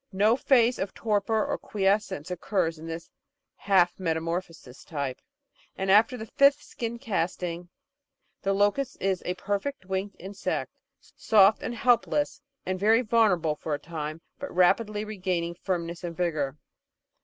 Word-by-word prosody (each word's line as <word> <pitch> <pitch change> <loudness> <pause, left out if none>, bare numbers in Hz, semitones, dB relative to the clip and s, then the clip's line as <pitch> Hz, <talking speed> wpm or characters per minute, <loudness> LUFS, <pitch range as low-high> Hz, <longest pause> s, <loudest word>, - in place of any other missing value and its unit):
No 210 +4 +3
phase 245 -2 +3
of 190 0 -3
torpor 215 0 +1
or - - -2
quiescence 195 -5 0
occurs 165 -3 -1
in 160 - -8
this 165 0 -6 0.5
"half 185 -3 +2
metamorphosis" 165 -5 -3
type, 140 -5 -4 0.6
and 190 0 0
after 225 +5 +5
the 220 - -6
fifth 280 +4 +4
skin 235 0 -5
casting 180 -6 -3 0.7
the 195 - 0
locust 205 +7 +1
is 190 -1 0
a 180 - -1
perfect, 205 +4 -3
winged 190 +2 -3
insect, 195 +2 -4 0.4
soft 205 -1 +5
and 240 - -4
helpless 250 +6 +1 0.2
and 185 0 -2
very 220 +5 +4
vulnerable 205 -9 +3
for 150 0 -3
a - - -7
time, 155 -1 -6 0.2
but 280 - -5
rapidly 210 +4 +2
regaining 180 -5 -2
firmness 170 -1 -3
and 170 -1 -5
vigour. 155 -6 -1
190 Hz, 140 wpm, -27 LUFS, 170-215 Hz, 0.7 s, after